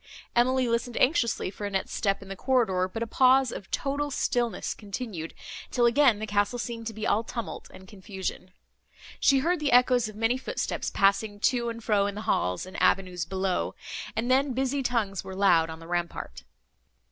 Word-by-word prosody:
Emily 255 +1 +3
listened 235 +1 -1
anxiously 245 - +2
for 205 0 -5
Annette's 195 -1 -2
step 195 -1 0
in - - -14
the 195 - -6
corridor, 195 -7 +1
but 225 +3 -3
a - - -2
pause 255 +2 +4
of 195 - -8
total 285 +1 -1
stillness 240 -3 -1
continued, 200 -5 -6 0.3
till 240 -2 +2
again 240 -1 +5
the 215 - -4
castle 205 +3 0
seemed 230 -1 -5
to 225 - -4
be 215 - -4
all 220 - +2
tumult 230 0 -6
and 190 - -14
confusion. 190 -2 -6 0.7
She 275 - +5
heard 355 0 +2
the 295 -2 0
echoes 245 -2 +4
of 215 - -11
many 225 +4 +1
footsteps, - - -3
passing 200 +1 +1
to 240 -1 +2
and 230 0 -7
fro 205 -3 +2
in 200 - -4
the 210 - -5
halls 90 - 0
and 185 - -7
avenues 180 -4 +2
below, 190 +1 -1 0.4
and 240 +3 0
then 270 +1 +3
busy 265 +2 0
tongues 225 -7 -1
were 190 0 -8
loud 175 -5 +4
on 160 - -7
the 165 - -12
rampart. 170 - -4
220 Hz, 185 wpm, -27 LUFS, 195-250 Hz, 0.7 s, again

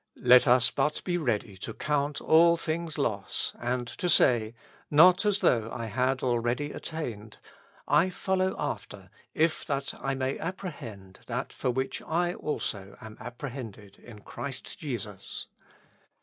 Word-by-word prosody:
Let 125 0 +7
us 125 0 +5
but 150 +2 0
be 180 - -1
ready 115 - -1
to 110 +4 -7
count 145 -1 -1
all 170 +1 +6
things 165 -1 -3
loss, - - -1
and 120 +1 -1
to 180 - 0
say, 120 -7 +4 0.2
" - - -29
Not 180 +7 +6
as 205 0 +2
though 115 - +3
I 115 -2 -4
had 130 +4 0
already 120 +4 0
attained; 115 -10 -6 0.5
I 150 +6 +4
follow 190 0 0
after, 105 -8 -5 0.2
if 160 +1 +2
that 140 -1 -2
I 135 +1 -1
may 130 0 -2
ap 180 +3 -3
prehend 110 - -9
that - - -4
for - - -2
which 130 +2 -2
I 175 +2 0
also 100 - -4
am 110 -1 -10
apprehended 120 -5 -8
in 110 -3 -13
Christ 135 - -7
Jesus." 110 - -5
130 Hz, 150 wpm, -28 LUFS, 115-160 Hz, 0.5 s, Let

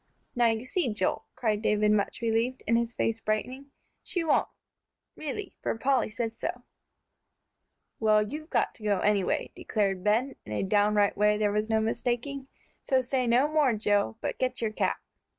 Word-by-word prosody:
"Now 240 -1 +4
you 225 +1 0
see, 260 -1 0
Joel," 205 -3 -1
cried 215 -3 0
David, 210 -1 +2
much 205 +1 0
relieved, 230 +3 0
and 230 - +3
his 235 0 +1
face 225 -1 -1
brightening, 250 +6 -2 0.3
"she 350 - -2
won't, 310 -3 +2 0.7
really, 325 +6 -5
for - - -2
Polly 265 0 +1
says 225 +1 -3
so." - - -4 1.4
"Well, 215 -1 +4
you've 305 +9 -7
got - - +1
to 220 - -16
go 205 -3 +1
anyway," 205 -2 +1
declared 195 -4 -1
Ben, 235 +6 +1
in 105 - -7
a 105 - -1
downright 205 +1 +3
way 210 +1 +3
there 210 -1 +1
was 210 +1 -1
no 220 0 +3
mistaking. 245 +4 -2 0.3
"So 260 -1 +1
say 255 0 0
no 245 +5 +4
more, 300 -5 +3
Joe, 205 - +1
but - - -3
get 255 0 -1
your 225 -2 -1
cap." - - 0
225 Hz, 170 wpm, -28 LUFS, 210-255 Hz, 1.4 s, Now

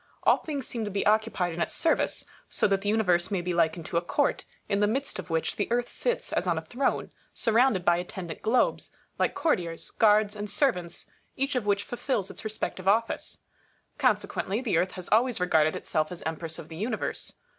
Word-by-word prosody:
All - - +5
things 285 -4 -4
seem 230 -2 -3
to 210 - -2
be 200 0 -1
occupied 210 -5 +2
in 170 - -4
its - - -1
service; 330 - +1 0.2
so - - +1
that 195 -1 +1
the 205 - -1
Universe 185 -5 +2
may 195 -3 0
be 180 0 -2
likened 165 -1 +1
to 170 - -2
a - - +3
court, 175 - 0 0.2
in 200 - +1
the 205 - +4
midst 270 +1 -2
of 185 - -7
which 160 -1 -1
the - - -1
Earth 245 0 +1
sits - - -2
as - - 0
on 170 -2 +2
a 160 - -4
throne, 260 +10 -1 0.2
surrounded 225 -5 +3
by 170 0 +5
attendant 175 -2 -6
globes, 235 +3 +1 0.3
like - - +1
courtiers, 175 - 0
guards, 210 -1 +4
and 205 0 -5
servants, 180 - 0 0.3
each 275 +2 0
of 245 -5 -1
which 200 0 +2
fulfils 240 -5 -2
its - - -8
respective 210 -3 -4
office. 225 +3 +1 0.6
Consequently, 200 +4 +1
the 240 -8 0
Earth 180 +3 +1
has 185 -2 -6
always 235 +1 +3
regarded 160 -3 +3
itself 155 +1 -1
as 175 - -8
Empress 160 0 -4
of - - -9
the 160 - -9
Universe. 220 +7 -3
200 Hz, 200 wpm, -28 LUFS, 175-230 Hz, 0.6 s, All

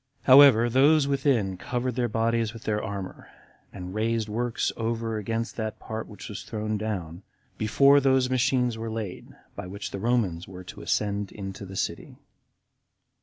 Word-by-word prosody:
However, 130 -3 +8
those 140 +4 +4
within 125 -9 +1
covered 125 +5 -2
their 120 0 0
bodies 115 0 0
with 115 - -11
their 105 -1 -1
armor, 100 -3 -6 0.4
and 90 -1 -8
raised 110 +1 0
works 120 +2 -1
over 115 -1 -2
against 115 +2 -3
that 110 -2 -3
part 110 0 -6
which 105 - -10
was 100 -2 -6
thrown 110 -1 -3
down, 95 -5 -4 0.4
before 140 +6 +5
those 130 -2 +3
machines 125 -2 +1
were 115 0 -4
laid 110 -5 -5 0.3
by - - -6
which 100 +2 -6
the 100 - -5
Romans 100 -7 0
were 90 -1 -10
to - - -10
ascend 100 -1 -1
into 95 -1 -7
the 95 - -9
city. - - -4
110 Hz, 160 wpm, -26 LUFS, 100-120 Hz, 0.4 s, However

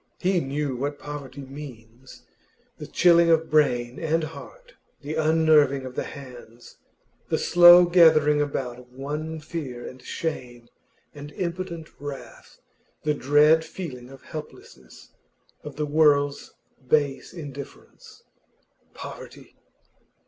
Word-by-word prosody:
He 185 0 +1
knew 140 -2 -3
what 145 +3 -3
poverty 140 -2 -8
means. 130 -3 -12 0.6
The - - -7
chilling 170 -1 +4
of 160 -1 +2
brain 125 -5 +1
and 160 0 0
heart, - - -10 0.3
the 150 +2 -5
unnerving 155 -4 +3
of 130 - -7
the - - -3
hands, 120 -3 -12 0.5
the - - +1
slow 175 0 +8
gathering 155 -4 +5
about 125 -4 -4
one 150 +5 -5
of 155 - -10
fear 140 -7 -6
and 130 0 -11
shame 125 -6 -6 0.4
and 145 0 -10
impotent 170 -2 -5
wrath, 145 -1 -10 0.4
the 150 - +1
dread 150 +3 +4
feeling 130 -9 -8
of 135 -1 -14
helplessness, 150 - -11 0.5
of 150 -2 -9
the 150 - -2
world's 145 -2 +2 0.4
base 140 0 0
indifference. 145 -5 -11 0.7
Poverty! - - -11
145 Hz, 115 wpm, -24 LUFS, 130-160 Hz, 0.7 s, slow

